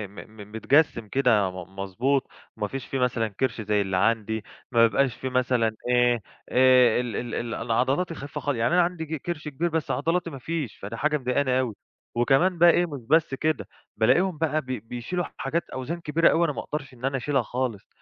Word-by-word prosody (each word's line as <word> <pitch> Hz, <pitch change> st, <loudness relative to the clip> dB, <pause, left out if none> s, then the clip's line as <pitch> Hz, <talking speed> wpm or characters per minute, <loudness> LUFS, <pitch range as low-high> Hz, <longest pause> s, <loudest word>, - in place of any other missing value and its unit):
م -, -, -18 dB, 0.2 s
م 105 Hz, +1 st, -12 dB
متجسِّم 115 Hz, 0 st, +2 dB
كده 115 Hz, -6 st, +2 dB
م 90 Hz, +1 st, -10 dB
مضبوط. 125 Hz, +8 st, 0 dB, 0.3 s
ما 105 Hz, -, -1 dB
فيش 135 Hz, +3 st, -6 dB
فيه 135 Hz, -, -2 dB
مثلًا 120 Hz, -3 st, +1 dB
كِرش 115 Hz, +3 st, -2 dB
زي 105 Hz, -1 st, +1 dB
اللي 95 Hz, -1 st, -1 dB
عندي، 110 Hz, +1 st, +1 dB, 0.3 s
ما 115 Hz, -1 st, +6 dB
بيبقاش 130 Hz, +3 st, +1 dB
في 130 Hz, -, -4 dB
مثلًا 125 Hz, -3 st, +1 dB
إيه، 120 Hz, -2 st, +3 dB, 0.3 s
آآ 125 Hz, -2 st, +5 dB
ال 120 Hz, -4 st, -5 dB
ال 120 Hz, -1 st, -3 dB
ال 120 Hz, -1 st, -3 dB
العضلات 130 Hz, +9 st, 0 dB
الخفيفة 145 Hz, -3 st, -6 dB
خال 145 Hz, -3 st, -1 dB
يعني 115 Hz, +6 st, +1 dB
أنا 180 Hz, -, +5 dB
عندي 170 Hz, -2 st, -3 dB
ج 160 Hz, +1 st, -4 dB
كِرش 155 Hz, +1 st, -5 dB
كبير، 150 Hz, +4 st, -1 dB
بس 160 Hz, -2 st, -1 dB
عضلاتي 165 Hz, +6 st, 0 dB
ما 140 Hz, -4 st, -8 dB
فيش، 155 Hz, -3 st, -4 dB
فده 105 Hz, +4 st, -7 dB
حاجة 150 Hz, +3 st, +1 dB
مضايقاني 130 Hz, 0 st, +1 dB
أوي. 120 Hz, -5 st, -2 dB, 0.4 s
وكمان 135 Hz, +9 st, +3 dB
بقى 175 Hz, +1 st, +7 dB
إيه 175 Hz, +1 st, +4 dB
مش 145 Hz, -6 st, -7 dB
بس 160 Hz, -3 st, +3 dB
كده، 155 Hz, +3 st, -1 dB, 0.3 s
بالاقيهم 150 Hz, -, +3 dB
بقى 155 Hz, -1 st, 0 dB
ب 135 Hz, -, -22 dB
بيشيلوا 125 Hz, -, -4 dB
حاجات 160 Hz, +5 st, -1 dB
أوزان 150 Hz, +7 st, -5 dB
كبيرة 165 Hz, +1 st, +3 dB
أوي 170 Hz, -, +3 dB
أنا 150 Hz, -, -1 dB
ما -, -, -5 dB
أقدرش 145 Hz, -3 st, -6 dB
إن 125 Hz, +1 st, -7 dB
أنا 135 Hz, 0 st, 0 dB
أشيلها 135 Hz, +1 st, +1 dB
خالص، 120 Hz, -3 st, -3 dB
130 Hz, 205 wpm, -25 LUFS, 115-155 Hz, 0.4 s, بقى